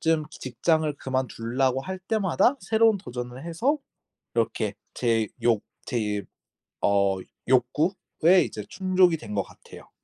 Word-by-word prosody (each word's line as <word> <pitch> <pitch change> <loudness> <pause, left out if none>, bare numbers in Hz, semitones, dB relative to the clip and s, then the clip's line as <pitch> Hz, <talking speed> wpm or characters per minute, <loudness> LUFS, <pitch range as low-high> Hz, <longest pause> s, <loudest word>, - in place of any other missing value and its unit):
좀 160 -1 +2
직장을 155 +3 0
그만두려고 130 0 -1
할 190 +6 -5
때마다 200 - +2
새로운 220 -1 +4
도전을 125 -3 -7
해서 200 - +1 0.6
이렇게 110 -2 0 0.2
제 115 -3 +1
욕 115 -3 +3 0.2
제 105 -5 -1 0.6
어 100 -1 +3 0.3
욕구에 160 +7 +3
이제 105 - -6
충족이 185 -3 +3
된 105 -9 -7
것 100 - +1
같아요. - - -15
135 Hz, 245 characters per minute, -26 LUFS, 115-185 Hz, 0.6 s, 새로운